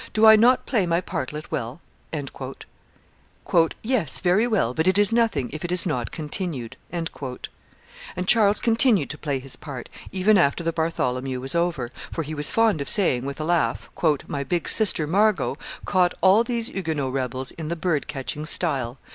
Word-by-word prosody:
Do 215 Hz, +1 st, +4 dB
I 220 Hz, 0 st, +10 dB
not 245 Hz, +4 st, +4 dB
play 210 Hz, -8 st, +1 dB
my 170 Hz, 0 st, +2 dB
partlet 150 Hz, -3 st, -5 dB
well?" 120 Hz, +4 st, -4 dB, 2.0 s
"Yes, 220 Hz, -, 0 dB
very 190 Hz, +6 st, +2 dB
well; 195 Hz, -, +1 dB
but 160 Hz, +6 st, 0 dB
it 185 Hz, +1 st, +4 dB
is 205 Hz, +1 st, +4 dB
nothing 225 Hz, -, +1 dB
if 155 Hz, -, -6 dB
it 175 Hz, -, -3 dB
is 180 Hz, -1 st, +3 dB
not 125 Hz, -9 st, -2 dB
continued." 150 Hz, -, -4 dB, 0.2 s
And 170 Hz, -2 st, -2 dB, 1.2 s
Charles 210 Hz, 0 st, +4 dB
continued 225 Hz, -, +2 dB
to 150 Hz, -, -8 dB
play 145 Hz, -3 st, -2 dB
his 130 Hz, 0 st, -9 dB
part, 140 Hz, -5 st, -8 dB, 0.2 s
even 195 Hz, +2 st, +3 dB
after 170 Hz, +1 st, +2 dB
the 165 Hz, 0 st, -1 dB
Bartholomew 130 Hz, -6 st, -2 dB
was 135 Hz, +1 st, -3 dB
over, 170 Hz, -8 st, -1 dB, 0.2 s
for 165 Hz, -, -3 dB
he 155 Hz, +1 st, -6 dB
was 150 Hz, -1 st, 0 dB
fond 225 Hz, -9 st, +2 dB
of 140 Hz, -, -4 dB
saying 130 Hz, -, +2 dB
with 140 Hz, +1 st, -6 dB
a -, -, -2 dB
laugh, 170 Hz, -1 st, 0 dB, 0.3 s
"My 140 Hz, -1 st, -4 dB
big 170 Hz, +5 st, -2 dB
sister 195 Hz, -8 st, +2 dB
Margot 205 Hz, +6 st, +2 dB, 0.3 s
caught 180 Hz, -2 st, +2 dB
all 195 Hz, +4 st, +5 dB
those 235 Hz, -1 st, -2 dB
Huguenot 155 Hz, -, -3 dB
rebels 130 Hz, 0 st, -2 dB
in 160 Hz, -2 st, -7 dB
the 170 Hz, -, -2 dB
bird 165 Hz, -3 st, -1 dB
catching 145 Hz, +3 st, -5 dB
style. 130 Hz, -4 st, +3 dB
165 Hz, 170 wpm, -24 LUFS, 140-200 Hz, 2.0 s, I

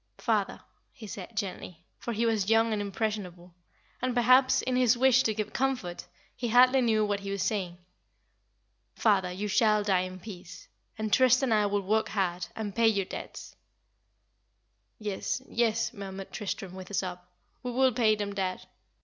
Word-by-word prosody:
"Father," -, -, 0 dB, 0.3 s
he 235 Hz, -, -12 dB
said, 205 Hz, +2 st, -9 dB
gently, 180 Hz, -3 st, -5 dB
for 235 Hz, -, -4 dB
he 230 Hz, +1 st, 0 dB
was 215 Hz, -3 st, +1 dB
young 225 Hz, 0 st, +3 dB
and 210 Hz, -, -1 dB
impressionable, 195 Hz, -4 st, -4 dB, 0.5 s
and 255 Hz, 0 st, -1 dB
perhaps, 255 Hz, +2 st, +4 dB
in 255 Hz, -, -1 dB
his 250 Hz, -1 st, +4 dB
wish 255 Hz, 0 st, +5 dB
to 220 Hz, -, 0 dB
give 215 Hz, -1 st, -4 dB
comfort, 255 Hz, -10 st, -2 dB, 0.3 s
he 245 Hz, -, -3 dB
hardly 255 Hz, +3 st, +5 dB
knew 220 Hz, -3 st, +2 dB
what 205 Hz, -1 st, -1 dB
he 200 Hz, 0 st, -7 dB
was 200 Hz, -1 st, -2 dB
saying. 185 Hz, -4 st, -2 dB, 1.2 s
"Father, 195 Hz, -5 st, +2 dB
you 195 Hz, +4 st, -4 dB
shall 210 Hz, +1 st, +3 dB
die 195 Hz, -3 st, +2 dB
in 185 Hz, 0 st, -5 dB
peace; 185 Hz, -3 st, -10 dB, 0.3 s
and 215 Hz, -1 st, -3 dB
Trist 255 Hz, 0 st, +5 dB
and 250 Hz, -4 st, +2 dB
I 210 Hz, -1 st, +3 dB
will 205 Hz, 0 st, 0 dB
work 215 Hz, +3 st, +1 dB
hard, 180 Hz, -3 st, -1 dB
and 210 Hz, -3 st, -4 dB
pay 230 Hz, -1 st, +4 dB
your 200 Hz, -3 st, +2 dB
debts." -, -, -8 dB, 1.4 s
"Yes, 210 Hz, +2 st, -3 dB
yes," 230 Hz, -1 st, 0 dB
murmured 195 Hz, -2 st, -8 dB
Tristram, 195 Hz, -2 st, -5 dB
with 185 Hz, -1 st, -9 dB
a 205 Hz, -, -4 dB
sob; 180 Hz, -2 st, -2 dB, 0.4 s
"we 250 Hz, -, -4 dB
will 260 Hz, +1 st, +2 dB
pay 220 Hz, -2 st, +3 dB
them, 205 Hz, -1 st, -4 dB
dad." 190 Hz, -2 st, -3 dB
210 Hz, 170 wpm, -28 LUFS, 190-235 Hz, 1.4 s, wish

